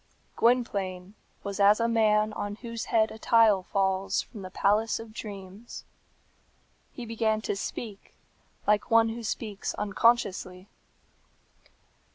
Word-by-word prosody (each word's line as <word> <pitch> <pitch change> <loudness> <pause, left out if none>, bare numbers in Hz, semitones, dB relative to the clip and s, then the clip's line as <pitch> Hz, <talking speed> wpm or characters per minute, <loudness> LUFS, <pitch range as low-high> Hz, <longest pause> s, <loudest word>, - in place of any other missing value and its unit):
Gwynplaine 200 -6 0 0.3
was 200 0 -5
as 205 +2 +5
a 230 - +2
man 215 -2 +2
on 205 0 -4
whose 230 +1 -6
head 220 -1 +2
a 220 - -10
tile 225 -4 +4
falls 190 0 0
from 215 - -11
the 185 - -7
palace 210 +4 +1
of 225 -1 -10
dreams. 200 +1 -9 1.1
He 245 - -8
began 225 -1 0
to 210 - -2
speak, 205 +1 -7 0.5
like 210 0 +2
one 230 0 +5
who 230 +1 -5
speaks 215 -2 -4
unconsciously. 200 -3 +1
210 Hz, 125 wpm, -28 LUFS, 195-230 Hz, 1.1 s, as